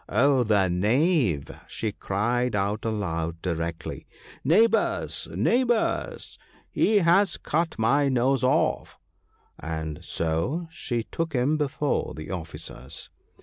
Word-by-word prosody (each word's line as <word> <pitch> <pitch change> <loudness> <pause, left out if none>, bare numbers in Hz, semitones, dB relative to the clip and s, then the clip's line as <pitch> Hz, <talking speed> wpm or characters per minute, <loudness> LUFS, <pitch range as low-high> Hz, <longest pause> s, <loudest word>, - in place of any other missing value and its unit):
' - - -27
Oh, 135 +4 +4
the 105 -5 +3
knave! 105 - +2
' - - -27
she 110 - -3
cried 120 +5 -1
out 100 +2 -1
aloud, 85 -7 -2
directly, 85 -2 -4 0.2
' - - -20
Neighbours, 230 - +2
neighbours! 240 -2 0 0.3
he 215 - +3
has 190 +4 +4
cut 165 +2 -1
my 140 +6 +3
nose 130 +1 +2
off! 130 - +1 0.4
' - - -37 0.2
and 80 -2 -4
so 85 - -1
she 120 -7 -3
took 165 +6 -4
him 130 +4 +2
before 145 -1 -1
the 75 +3 -7
officers. 80 -7 -6
120 Hz, 125 wpm, -26 LUFS, -, 0.4 s, Oh